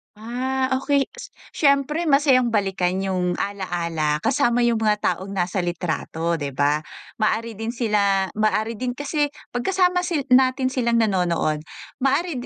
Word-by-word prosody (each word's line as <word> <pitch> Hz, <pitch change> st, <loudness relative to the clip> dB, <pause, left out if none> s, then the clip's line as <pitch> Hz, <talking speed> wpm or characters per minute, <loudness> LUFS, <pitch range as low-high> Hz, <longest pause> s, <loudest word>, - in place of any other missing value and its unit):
Ah, 260 Hz, +4 st, -2 dB
okey. 275 Hz, +1 st, +1 dB
Si -, -, -10 dB, 0.3 s
siyempre, 280 Hz, +4 st, +2 dB
masayang 270 Hz, -5 st, +3 dB
balikan 190 Hz, -3 st, 0 dB
yung 185 Hz, -2 st, -1 dB
alaala 170 Hz, -6 st, -2 dB
kasama 245 Hz, -1 st, +2 dB
yung 235 Hz, -1 st, +2 dB
mga 215 Hz, -1 st, +1 dB
taong 195 Hz, +2 st, -2 dB
nasa 180 Hz, 0 st, -1 dB
litrato, 170 Hz, -1 st, -2 dB
di 140 Hz, -2 st, -4 dB
ba? 145 Hz, +3 st, +1 dB, 0.3 s
Maaari 220 Hz, 0 st, -1 dB
din 225 Hz, +2 st, -4 dB
sila 200 Hz, -5 st, +1 dB
maaari 215 Hz, +1 st, 0 dB
din 250 Hz, +2 st, -2 dB
kasi 290 Hz, +3 st, -1 dB, 0.2 s
'pag 245 Hz, 0 st, -4 dB
kasama 360 Hz, -1 st, +2 dB
si 320 Hz, -5 st, -1 dB
natin 255 Hz, 0 st, +4 dB
silang 235 Hz, -3 st, +1 dB
nanonood, 170 Hz, -7 st, 0 dB, 0.3 s
maaari 270 Hz, 0 st, 0 dB
225 Hz, 140 wpm, -22 LUFS, 185-260 Hz, 0.3 s, natin